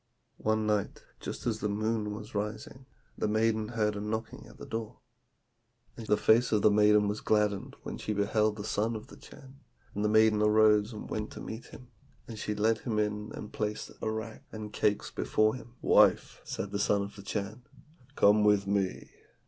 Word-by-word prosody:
"One 110 0 +1
night, 105 -2 -1 0.2
just - - -6
as 115 -3 -1
the 105 - -1
moon 110 +1 -1
was 105 +1 -9
rising, 110 +5 -5 0.3
the - - -1
maiden 110 0 +1
heard 105 -2 0
a 100 - -4
knocking 110 +2 -4
at - - -15
the - - -9
door, 115 +1 -5 1.0
and 115 -2 -9
the 105 - +3
face 115 +3 +4
of 105 -2 +2
the 105 - +6
maiden 105 0 +5
was 105 +1 -2
gladdened 105 -2 0
when - - -6
she 105 - -2
beheld 105 +1 +1
the 105 - -6
son 110 +2 -1
of 110 - -6
the - - -12
Chan; 135 -1 -15 0.3
and 105 - -2
the 105 - +2
maiden 110 0 +4
arose 105 0 +4
and 110 - -8
went 105 0 -3
to - - -9
meet 110 +2 -7
him, 125 - -13 0.4
and 110 -2 -8
she 105 - -3
led 110 +1 +2
him 115 -4 -3
in 105 0 -1
and 105 - -8
placed 105 0 -3
arrack 110 0 -4
and 105 -1 -7
cakes 105 -1 0
before 110 0 +1
him. 120 -1 -10
'Wife,' - - +4
said 100 - -5
the 100 - -2
son 100 0 +2
of 100 - -8
the 100 - -10
Chan, 105 +3 -4 0.5
'come 105 +1 +5
with 105 -1 +4
me!' 100 -1 -1
105 Hz, 195 wpm, -30 LUFS, 105-110 Hz, 1.0 s, the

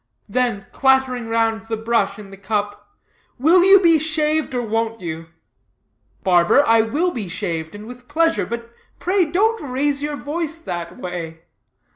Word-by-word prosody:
Then 225 -3 -1
clattering 265 -3 +2
round 225 -1 0
the 225 -1 -2
brush 225 -2 0
in 205 -2 -11
the - - -9
cup, 205 - -3 0.5
"Will 330 +7 +5
you 390 +1 +8
be 335 -4 +5
shaved, 310 -2 0
or 245 - -1
won't 225 0 -2
you?" 165 -2 -6 1.0
"Barber, 180 +10 +4
I 225 0 +5
will 295 +11 0
be 215 - -5
shaved, 165 -2 -4
and 210 +1 -9
with 245 +1 -12
pleasure; 330 0 +1
but, 235 0 -6 0.3
pray, 370 0 +1
don't 420 +8 +1
raise 280 +1 -1
your 295 0 -3
voice 320 +2 -4
that 175 - -6
way. 165 -2 -6
235 Hz, 155 wpm, -20 LUFS, 205-305 Hz, 1.0 s, you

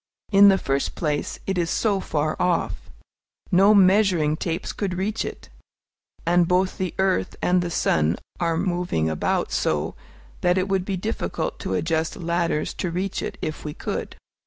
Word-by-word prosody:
In 200 0 +8
the 195 - +5
first 140 -5 -1
place, 150 -3 -2
it 190 -2 -1
is 170 -1 0
so 205 0 +1
far 155 -3 -1
off. 180 -1 -1 0.6
No 195 +3 +6
measuring 185 -6 +4
tapes 165 +1 -3
could 195 -3 -2
reach 205 +4 -1
it; - - -8 0.8
and 175 0 +3
both 185 +2 +1
the 185 -3 -2
earth 190 -1 +1
and 180 0 +2
the 175 - -2
sun 80 - +1 0.2
are 165 -2 +1
moving 175 - 0
about 80 - -1
so, 75 -1 0 0.5
that 180 +1 +3
it 185 +1 +1
would 190 -2 0
be 195 -1 -2
difficult 215 +5 -3
to - - -2
adjust 160 -1 0
ladders 170 -2 -1
to 180 - -1
reach 185 +3 -2
it, - - -5
if 155 -1 -4
we 150 -1 -5
could. - - -4
180 Hz, 165 wpm, -24 LUFS, 160-190 Hz, 0.8 s, In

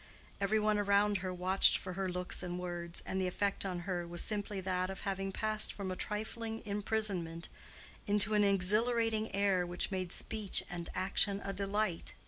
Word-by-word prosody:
Every 200 +2 +2
one 215 0 +2
around 205 0 +3
her 185 +1 -3
watched 185 +2 +4
for 185 - -6
her 190 0 -2
looks 180 0 +1
and 180 -1 -4
words, 175 -1 -4
and 190 - -1
the 185 - +1
effect 200 +2 -1
on 180 -2 -3
her 175 -2 -3
was 175 0 -1
simply 205 -2 -1
that 185 0 -1
of 195 - -6
having 195 0 -2
passed 215 +2 +2
from 195 -2 -5
a - - -3
trifling 220 +3 -4
imprisonment 200 -5 -1 0.6
into 210 +1 +4
an 210 -1 +4
exhilarating 215 +3 +2
air 195 -2 +2
which 175 +2 -3
made 185 -2 -2
speech 215 -1 -2
and 170 -1 -5
action 195 +2 +2
a 195 - -3
delight. 200 -2 -1
195 Hz, 175 wpm, -34 LUFS, 180-210 Hz, 0.6 s, watched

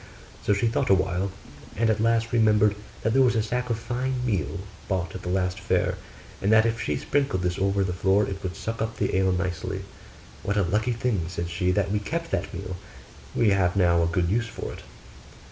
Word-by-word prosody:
So 105 - +3
she 100 - +1
thought 120 +3 +1
a 95 - +7
while; 95 +1 0 0.5
and 115 +2 +3
at 110 - 0
last 115 +1 +2
remembered 105 -2 +4 0.3
that 115 - +1
there 135 - +5
was 125 -2 +4
a 110 - +2
sack 125 +3 -2
of 115 - 0
fine 125 +2 -2
meal 100 -4 -1 0.3
bought 95 -3 -1
at 95 - -6
the 90 - -5
last 90 +1 0
fair, 100 - +1 0.5
and 100 - +2
that 110 0 +6
if 115 0 0
she 75 - -1
sprinkled 135 - 0
this 90 0 -1
over 100 0 +2
the 95 -2 -1
floor 95 +3 +2
it 95 -1 -5
would 90 -4 -4
suck 115 +6 -4
up 110 0 -2
the - - 0
ale 95 0 +3
nicely. 90 -2 -2 0.6
'What 105 +1 -1
a 100 - +4
lucky 110 +7 +1
thing,' 115 -8 -1
said 85 -1 -4
she, 90 +2 0
'that 100 +1 +1
we 105 - +1
kept 165 +10 -4
that 95 0 -1
meal! 95 0 -5 0.6
we 115 -4 +4
have 95 -2 +2
now 85 -3 +4
a 85 - +2
good 85 +1 +1
use 115 +4 +1
for 115 - -6
it. - - -10
100 Hz, 220 wpm, -26 LUFS, 90-115 Hz, 0.6 s, a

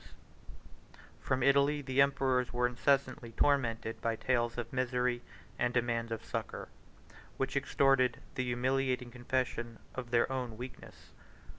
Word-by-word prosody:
] - - -22
From 130 -1 0
Italy 140 +2 +4
the 130 0 +2
emperors 135 -3 +2
were 125 0 +1
incessantly 130 -1 +1
tormented 115 -5 +1
by 115 -1 0
tales 120 0 0
of 115 -1 -5
misery 125 -1 0 0.4
and 120 0 +1
demands 115 -1 0
of 115 - -4
succor, - - -4 0.7
which - - -1
extorted 130 -3 +3
the 130 - -1
humiliating 125 0 0
confession 120 -2 -2 0.2
of 125 -2 -5
their 120 -1 +4
own 125 -4 -3
weakness. 125 +2 -10
125 Hz, 130 wpm, -32 LUFS, 120-130 Hz, 0.7 s, Italy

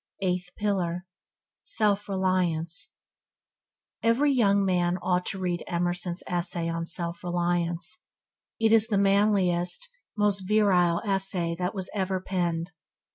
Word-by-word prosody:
Eighth 180 -1 -1
pillar 180 -4 -1 0.3
– - - -65 0.2
Self 205 -2 0
reliance 180 -4 -1 1.1
Every 255 +6 +3
young 200 -5 +3
man 180 -1 +1
ought 180 0 0
to - - -3
read 180 -2 -2
Emerson's 175 +1 -1
essay 175 -1 -1
on 165 0 -3
'Self 170 0 -2
Reliance'. 175 +2 -1 0.6
It 225 -1 +3
is 225 -1 +5
the 210 -4 +1
manliest, 195 - +2 0.3
most 205 -1 +2
virile 185 -5 +3
essay 195 -4 0
that 180 +3 -2
was 190 -2 -4
ever 190 -2 -1
penned. 175 -2 -2
185 Hz, 125 wpm, -27 LUFS, 175-200 Hz, 1.1 s, is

